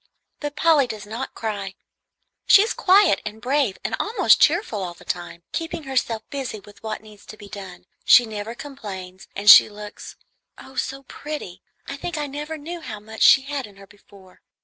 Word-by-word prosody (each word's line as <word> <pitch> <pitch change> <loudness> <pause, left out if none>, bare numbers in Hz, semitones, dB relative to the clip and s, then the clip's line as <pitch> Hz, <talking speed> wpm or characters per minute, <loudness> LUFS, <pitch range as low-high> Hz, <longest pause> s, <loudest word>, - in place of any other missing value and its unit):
But 295 -1 -5
Polly 300 -4 +4
does 215 -4 -7
not 225 +5 -6
cry. 200 -3 -4 0.7
She 400 - +8
is 450 - -2
quiet 380 - +4
and 215 +1 -7
brave 260 -4 0
and - - -1
almost 450 - +3
cheerful 220 - +2
all 175 -2 -5
the - - -17
time, 175 -1 -5
keeping 330 -1 -4
herself 250 -5 -2
busy 265 -6 -4
with 205 +1 -17
what 220 -1 -5
needs 210 -2 -16
to 215 - -10
be 205 - -12
done; 190 -3 -10 0.2
she 245 - +7
never 220 +1 -6
complains, 200 -9 -9
and 200 +1 -5
she 215 - +10
looks 210 0 -10 0.4
oh, 265 - -13
so 270 +1 -4
pretty! 285 -9 -7 0.2
I 275 - -6
think 345 +4 -5
I 295 - -2
never 295 +3 -6
knew 335 +3 -7
how 225 -8 -7
much 220 +1 -11
she 270 - +7
had 275 -3 -4
in 205 - -18
her 195 0 -14
before." 195 -1 -20
225 Hz, 190 wpm, -23 LUFS, 205-290 Hz, 0.7 s, she